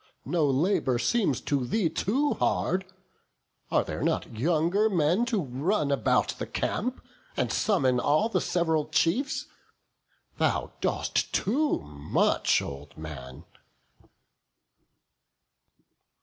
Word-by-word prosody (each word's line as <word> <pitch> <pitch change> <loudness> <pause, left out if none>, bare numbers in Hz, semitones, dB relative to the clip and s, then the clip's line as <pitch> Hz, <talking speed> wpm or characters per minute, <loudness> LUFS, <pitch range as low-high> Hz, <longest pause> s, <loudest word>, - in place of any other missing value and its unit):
no 165 -4 +1
labour 135 -2 +1
seems 195 - +1
For 145 - 0
thee 165 - 0
too 255 - 0
hard; 185 +1 0 0.8
are - - +2
there - - -5
not - - -1
younger 170 - +2
men 180 +4 +2
To 230 -4 +1
run 145 +3 -1
about 135 -6 +2
the - - -3
camp, 250 +3 -2 0.3
and - - 0
summon 130 - +2
all 150 - +2
The 230 - 0
sev'ral 160 -3 0
chiefs? 245 +13 +1 0.9
thou - - 0
dost - - 0
too 290 +9 +1
much, 75 -1 +1
old 70 +1 -9
man." 70 -5 -8
160 Hz, 105 wpm, -27 LUFS, 125-205 Hz, 0.9 s, are